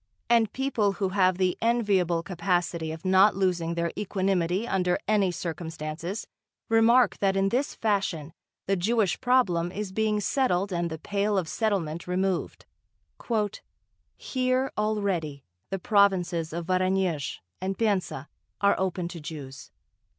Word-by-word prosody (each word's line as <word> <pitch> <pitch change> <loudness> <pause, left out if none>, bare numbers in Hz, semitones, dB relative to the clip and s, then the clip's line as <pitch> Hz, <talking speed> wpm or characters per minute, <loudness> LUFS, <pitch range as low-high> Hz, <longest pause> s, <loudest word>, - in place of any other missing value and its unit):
And 230 -3 +4
people 240 -7 0
who 195 -1 -1
have 185 -2 +2
the 185 -1 0
enviable 200 -8 +2
capacity 175 -3 -1
of 160 +3 -8
not 190 +2 +5
losing 175 -3 0
their 170 0 -1
equanimity 190 0 0
under 180 -2 +1
any 205 -3 +3
circumstances, 165 +2 -5 0.4
remark 230 +2 +4
that 195 -1 +2
in 195 0 +2
this 260 +7 -1
fashion 190 -8 -1 0.3
the 195 - +1
Jewish 205 +2 +1
problem 200 -10 +2
is 200 0 -4
being 215 +1 +1
settled 200 -4 0
and 170 -1 -1
the 160 - -5
Pale 205 +4 -1
of 180 -4 0
Settlement 175 -6 -1
removed. 185 0 -1 1.5
"Here 255 0 0
already 195 -10 -1 0.3
the 195 - -2
provinces 190 -6 +2
of 170 +1 -4
Voronezh 185 -4 0 0.2
and 190 0 -2
Penza 190 -10 -1 0.3
are 200 0 +4
opened 180 -2 -2
to 170 - -7
Jews.... 150 -4 -8
190 Hz, 130 wpm, -27 LUFS, 170-210 Hz, 1.5 s, not